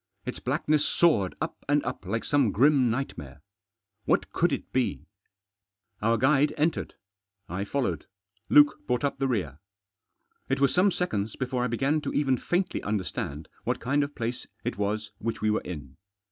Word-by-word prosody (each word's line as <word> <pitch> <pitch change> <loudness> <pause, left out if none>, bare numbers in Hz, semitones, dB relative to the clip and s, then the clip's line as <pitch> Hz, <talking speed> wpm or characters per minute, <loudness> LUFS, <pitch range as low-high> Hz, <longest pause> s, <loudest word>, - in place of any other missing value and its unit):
Its - - -4
blackness 150 -1 +1
soared 150 - +3
up - - -4
and 145 0 +3
up 95 - -5
like 115 +4 -1
some 140 -7 +2
grim 130 +2 +4
nightmare. 80 - -4 0.7
What - - +1
could - - +2
it - - -4
be? 130 -2 0 1.0
Our 115 +2 +3
guide 140 +4 +3
entered. 155 +2 0 0.5
I 95 +3 -3
followed; 100 - -2 0.4
Luke 150 0 +6
brought 125 -1 0
up 140 -1 -1
the 135 - +1
rear. 85 - -2 0.9
It 135 +1 +1
was 140 -1 +3
some 185 +3 +4
seconds 110 - -2
before 125 -1 -1
I - - +1
began 135 +6 +1
to - - -4
even 135 -3 +3
faintly 180 +8 -1
understand 90 -7 -3 0.2
what - - -1
kind 140 +4 +1
of 145 +1 -5
place 120 +1 -3 0.2
it - - -2
was 105 +1 -2
which 115 +1 -3
we 110 0 +1
were 105 - +1
in. 75 -6 -8
125 Hz, 165 wpm, -27 LUFS, 105-145 Hz, 1.0 s, Luke